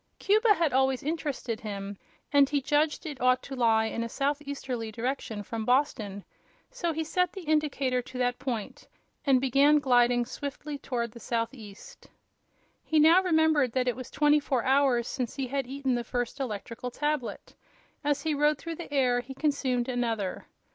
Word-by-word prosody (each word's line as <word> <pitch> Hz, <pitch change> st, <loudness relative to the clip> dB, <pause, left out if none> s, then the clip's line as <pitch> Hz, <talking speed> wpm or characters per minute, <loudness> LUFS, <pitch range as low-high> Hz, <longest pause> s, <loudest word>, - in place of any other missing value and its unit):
Cuba 425 Hz, +1 st, +4 dB
had 330 Hz, -6 st, +1 dB
always 265 Hz, -1 st, +2 dB
interested 285 Hz, -7 st, -3 dB
him, 200 Hz, -2 st, -5 dB, 0.4 s
and 280 Hz, -1 st, +6 dB
he 285 Hz, -, +1 dB
judged 295 Hz, +4 st, +1 dB
it 295 Hz, -4 st, -6 dB
ought 255 Hz, 0 st, +3 dB
to 270 Hz, -, -7 dB
lie 225 Hz, -3 st, +3 dB
in 230 Hz, -, -3 dB
a 230 Hz, -, -4 dB
southeasterly 275 Hz, -4 st, -3 dB
direction 230 Hz, -2 st, -3 dB
from 225 Hz, +2 st, -4 dB
Boston. 220 Hz, -6 st, 0 dB, 0.5 s
So 360 Hz, -10 st, -2 dB
he 320 Hz, 0 st, -2 dB
set 360 Hz, +2 st, 0 dB
the 385 Hz, -, -7 dB
indicator 290 Hz, -5 st, +1 dB
to 255 Hz, +1 st, -10 dB
that 245 Hz, -1 st, 0 dB
point 245 Hz, -5 st, -5 dB, 0.4 s
and 265 Hz, -2 st, +5 dB
began 275 Hz, +3 st, +4 dB
gliding 245 Hz, -3 st, +3 dB
swiftly 285 Hz, +3 st, -6 dB
toward 235 Hz, -4 st, -3 dB
the 235 Hz, -, -12 dB
southeast. 230 Hz, -3 st, -5 dB, 0.8 s
He 315 Hz, -, +2 dB
now 325 Hz, +4 st, +7 dB
remembered 315 Hz, -8 st, +3 dB
that 255 Hz, -1 st, 0 dB
it 245 Hz, -, +1 dB
was 255 Hz, 0 st, -8 dB
twenty 295 Hz, +1 st, +3 dB
four 265 Hz, -4 st, -1 dB
hours 265 Hz, -3 st, +3 dB
since 250 Hz, -4 st, -3 dB
he 270 Hz, -, -2 dB
had 270 Hz, 0 st, -2 dB
eaten 270 Hz, 0 st, -1 dB
the 240 Hz, -1 st, -1 dB
first 245 Hz, +3 st, -3 dB
electrical 235 Hz, 0 st, -4 dB
tablet. 295 Hz, -1 st, -3 dB, 0.5 s
As 290 Hz, -1 st, 0 dB
he 315 Hz, -1 st, 0 dB
rode 295 Hz, +1 st, +2 dB
through 330 Hz, -1 st, -6 dB
the 340 Hz, -, -8 dB
air 255 Hz, -4 st, +2 dB
he 255 Hz, +2 st, -8 dB
consumed 265 Hz, -4 st, 0 dB
another. 230 Hz, -6 st, -2 dB
265 Hz, 170 wpm, -28 LUFS, 240-295 Hz, 0.8 s, now